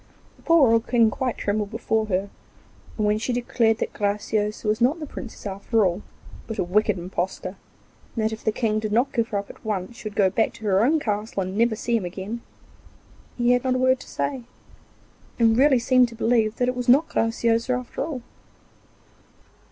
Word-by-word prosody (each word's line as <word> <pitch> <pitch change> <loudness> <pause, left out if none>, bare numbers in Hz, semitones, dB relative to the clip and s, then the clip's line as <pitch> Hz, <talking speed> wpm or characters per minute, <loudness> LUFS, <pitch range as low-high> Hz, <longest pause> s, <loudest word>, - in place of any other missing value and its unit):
The - - -23
poor 320 -8 +5
old 230 0 +2
King 230 -3 +4
quite 255 0 -2
trembled 205 0 -1
before 220 0 -1
her, 195 0 -1 0.7
and 215 - 0
when 210 +1 +2
she 240 - -2
declared 235 -2 +1
that - - -3
Graciosa 210 +1 -1
was 215 +2 +1
not 275 +8 +3
the 305 - -5
Princess 245 -6 -9
at 200 +2 -7
all, 190 -3 +3 0.5
but 225 - -5
a - - +1
wicked 210 +3 +1
impostor, 185 +1 -4 0.6
and 220 -2 0
that 220 - +1
if 220 - -8
the 220 - +2
King 215 -1 0
did 215 -1 -3
not 240 +5 +2
give 230 -2 +1
her 210 - -2
up 200 - -5
at - - -20
once 210 +1 -3
she 215 - -5
would 205 - -17
go 195 -2 +3
back 220 +3 +1
to 220 - -11
her 195 0 +3
own 310 +6 +3
castle 210 -4 -2
and 185 +1 -5
never 230 +1 +2
see 235 +2 -1
him 200 - -4
again, 195 +6 -5 1.0
he 240 0 +3
had 245 0 +2
not 255 -1 +1
a - - +1
word 260 0 +3
to - - -12
say, 270 -3 -2 1.0
and 225 -1 +4
really 270 +2 +5
seemed 250 +1 +4
to 230 - -11
believe 225 -1 +1
that 245 - 0
it 250 - 0
was 250 0 -2
not 285 +6 +6
Graciosa 230 +1 0
after 250 -1 -3
all. 280 -5 -5
225 Hz, 205 wpm, -24 LUFS, 210-245 Hz, 1.0 s, not